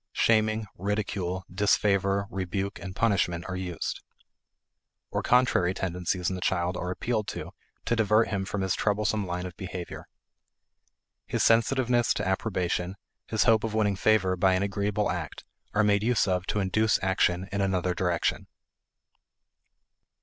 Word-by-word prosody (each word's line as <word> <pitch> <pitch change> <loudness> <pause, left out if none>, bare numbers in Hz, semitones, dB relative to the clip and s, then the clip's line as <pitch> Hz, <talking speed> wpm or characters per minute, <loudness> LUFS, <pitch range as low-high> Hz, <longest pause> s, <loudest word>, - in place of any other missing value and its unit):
Shaming, 110 -1 +2
ridicule, 95 -2 -2
disfavor, 100 0 +2
rebuke, 95 +1 -3
and 95 -1 -7
punishment 90 -6 +1
are 95 - -4
used. 90 -2 -4 1.1
Or - - -1
contrary 120 -8 +3
tendencies 90 -1 -2
in 95 - 0
the 90 - -5
child 90 0 0
are 90 - -3
appealed 110 +3 -2
to - - -5 0.3
to 120 - +1
divert 110 0 +3
him 100 -3 -1
from 100 +1 -3
his 95 -1 0
troublesome 105 -1 0
line 90 +1 -3
of 90 -1 -7
behavior. 90 -2 -7 1.2
His - - 0
sensitiveness 120 +1 +3
to - - -2
approbation, 95 -2 -1 0.3
his 110 - +1
hope 115 -2 +4
of 110 -1 -2
winning 105 -2 +2
favor 95 -2 +2
by 95 +1 +3
an 95 - +1
agreeable 100 +1 0
act, 85 -5 -5 0.3
are 110 - +4
made 100 -1 +3
use 115 0 +2
of 90 0 0
to 105 - 0
induce 110 +3 +2
action 95 -1 +1
in 100 +1 -1
another 95 -2 0
direction. 90 -1 -1
95 Hz, 145 wpm, -27 LUFS, 90-110 Hz, 1.2 s, hope